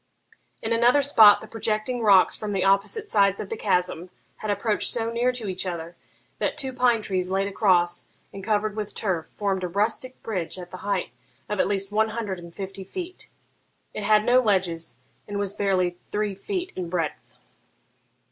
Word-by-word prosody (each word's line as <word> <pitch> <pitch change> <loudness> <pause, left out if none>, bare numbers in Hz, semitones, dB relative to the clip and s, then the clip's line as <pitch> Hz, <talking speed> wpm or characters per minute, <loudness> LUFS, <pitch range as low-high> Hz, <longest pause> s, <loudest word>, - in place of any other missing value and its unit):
In 225 - 0
another 245 +5 +4
spot 220 -7 +7
the 220 - -10
projecting 225 +2 -2
rocks 200 -4 +5
from 210 -1 -4
the 190 - 0
opposite 200 - +2
sides 200 - +3
of 200 - -5
the - - -3
chasm 180 -4 -1 0.3
had 215 - -5
approached 205 +1 +1
so 230 -1 -1
near 240 +2 +1
to 235 -4 -5
each 185 -1 -3
other 170 -1 -5 0.4
that - - -1
two 265 -3 -1
pine 245 -3 +2
trees 185 -3 -1
laid 195 +1 0
across, 180 -4 +2 0.3
and 195 -1 -8
covered 210 0 0
with 215 -2 -5
turf, 185 -6 -2
formed 195 -2 -1
a - - 0
rustic 220 +7 -2
bridge 190 -6 -3
at 180 -1 -9
the 185 - -7
height 195 - -2 0.4
of 210 -2 -3
at - - +3
least 195 0 -1
one 220 +1 +2
hundred 215 -4 -4
and 170 -1 -12
fifty 195 -1 -6
feet. 360 - -7 0.6
It - - -4
had 215 0 +4
no 250 +1 +5
ledges, 185 -7 0 0.3
and 205 -1 -4
was 200 -1 -1
barely 185 -3 0
three 210 -1 -1
feet 365 - -4
in 180 -2 -4
breadth. 165 -3 -3
205 Hz, 185 wpm, -25 LUFS, 185-225 Hz, 0.6 s, spot